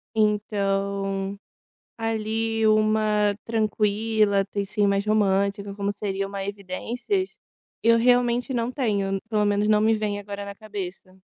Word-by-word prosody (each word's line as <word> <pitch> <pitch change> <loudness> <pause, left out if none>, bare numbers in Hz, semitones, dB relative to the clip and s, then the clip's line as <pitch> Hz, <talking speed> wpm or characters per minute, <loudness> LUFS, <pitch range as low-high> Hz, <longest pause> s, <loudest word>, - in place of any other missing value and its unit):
Então, 200 -2 0 0.6
ali 225 0 -1
uma 215 -1 +3
tranquila, 215 -2 +1
tem 200 0 -3
sim 205 +1 +1
mais 200 0 +1
romântica, 200 -1 +1
como 200 0 -2
seria 195 -1 -3
uma 200 0 -5
evidências, 210 - -3 0.4
eu 230 0 +5
realmente 245 +1 +2
não 235 0 -1
tenho, 200 -7 0
pelo 210 -2 +2
menos 205 0 +2
não 210 0 +4
me 220 +1 +4
vem 210 -2 -1
agora 200 0 -6
na 200 0 -7
cabeça. 190 -3 -7
210 Hz, 125 wpm, -25 LUFS, 200-220 Hz, 0.6 s, eu